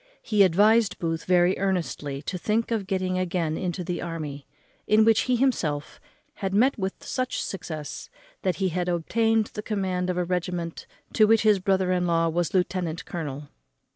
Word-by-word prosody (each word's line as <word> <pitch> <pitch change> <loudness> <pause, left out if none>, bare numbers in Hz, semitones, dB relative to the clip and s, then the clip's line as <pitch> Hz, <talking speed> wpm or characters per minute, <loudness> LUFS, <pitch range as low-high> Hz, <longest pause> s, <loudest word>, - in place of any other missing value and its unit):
He 210 -2 +2
advised 205 +3 +4
Booth 165 -1 -3
very 180 0 +4
earnestly 165 -7 -2
to 185 - -4
think 220 +6 0
of 215 -4 -1
getting 185 -2 -1
again 170 -3 -1
into 180 0 -3
the 175 0 -3
army, 155 -5 -6 0.4
in 215 +1 +5
which 225 -1 +5
he 250 - +4
himself 175 - -1 0.4
had 195 0 -1
met 255 +6 +4
with 190 -3 -4
such 255 -1 -2
success, 150 - -6 0.3
that 185 -2 0
he 190 -1 0
had 180 +1 -2
obtained 225 +6 +1
the 210 - -4
command 190 -4 -2
of 180 - -1
a 180 - 0
regiment 175 -1 -3 0.3
to 215 - +5
which 225 0 +4
his 210 -2 +4
brother 190 -1 +1
in 180 -1 +1
law 165 -1 +2
was 170 0 -1
lieutenant 180 -3 -1
colonel. 145 -4 -6
185 Hz, 170 wpm, -26 LUFS, 170-205 Hz, 0.4 s, in